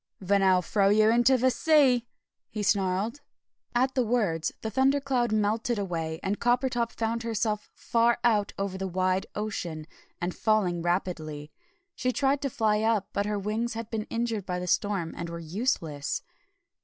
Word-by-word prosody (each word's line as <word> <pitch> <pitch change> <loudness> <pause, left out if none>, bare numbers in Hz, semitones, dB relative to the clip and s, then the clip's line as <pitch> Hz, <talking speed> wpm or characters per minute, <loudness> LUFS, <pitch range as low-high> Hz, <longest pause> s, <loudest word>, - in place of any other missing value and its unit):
"Then 200 +1 +2
I'll 185 -1 +4
throw 195 +3 +2
you 215 +1 +5
into 240 +3 +4
the 255 +1 +3
sea!" 260 -5 +3 0.4
he 215 -2 -4
snarled. 200 +6 0 0.5
At 260 +2 +2
the 260 - +2
words 210 -9 0
the 220 - -4
thundercloud 265 -1 +2
melted 215 +2 +1
away, 165 -5 -3
and 200 +2 -1
Coppertop 245 -1 +1
found 230 +1 -2
herself 220 -2 -2
far 235 0 +2
out 210 -4 +2
over 195 -1 -3
a 190 - -1
wide 185 +1 0
ocean, 175 -7 -4 0.3
and 175 0 -2
falling 200 -6 +1
rapidly. 160 -4 -2 0.4
She 255 - -1
tried 275 +2 +1
to 275 - -1
fly 215 -3 +1
up, 220 -3 +1
but 200 +1 0
her 210 0 -1
wings 220 +4 -2
had 230 -1 -6
been 220 -2 -2
injured 230 -4 -2
by 180 -1 -2
the 180 - -4
storm, 185 -2 0
and 170 0 -5
were 170 - -5
useless. 170 - -2
210 Hz, 165 wpm, -27 LUFS, 185-235 Hz, 0.5 s, you